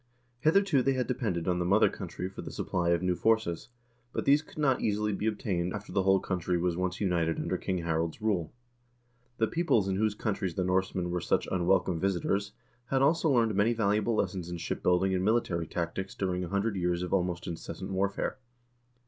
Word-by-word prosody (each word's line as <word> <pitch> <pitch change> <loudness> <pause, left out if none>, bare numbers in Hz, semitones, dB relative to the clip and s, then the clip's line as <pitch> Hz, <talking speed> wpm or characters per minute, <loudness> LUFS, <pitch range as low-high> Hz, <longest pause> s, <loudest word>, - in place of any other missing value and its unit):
Hitherto 165 -1 +3
they 135 +2 +2
had 130 -1 0
depended 110 -10 -2
on 90 -1 +1
the - - +1
mother 100 +5 +4
country 90 - -5
for 95 - -8
the - - -7
supply 90 -2 -1
of 85 +1 +2
new 90 0 +2
forces, 110 -5 +1 0.4
but - - -3
these 145 +2 +5
could 155 - -18
not 135 -4 +2
easily 105 0 0
be 105 +2 -2
obtained 95 -5 -1
after 105 0 -6
the 95 +1 +2
whole 95 0 +4
country 90 -1 -1
was 85 0 0
once 90 +1 -2
united 85 -5 +1
under - - -1
King 90 -2 -2
Harald's 80 +1 -1
rule. 100 -7 0 0.9
The 110 - +3
peoples 120 - +1
in 95 -1 0
whose 110 0 +1
coun 105 0 -1
tries 95 -4 -3
the 95 - 0
Norsemen 90 -1 0
were 90 0 -1
such - - 0
unwelcome 90 -1 +2
visitors 100 +2 0 0.3
had 135 +1 +2
also 160 +3 +3
learned 115 -5 +3
many 105 +4 +3
valuable 110 0 +1
lessons 90 -4 -2
in 85 - -4
ship 85 - -4
building 90 +2 +2
and 90 0 0
military 95 -6 +1
tactics 85 +3 -4
during 90 -2 -1
a 85 - -5
hundred 100 +2 0
years 90 -1 0
of 90 - -4
almost 90 -2 0
incessant 85 +3 -6
warfare. 100 +6 -1
95 Hz, 200 wpm, -29 LUFS, 90-110 Hz, 0.9 s, these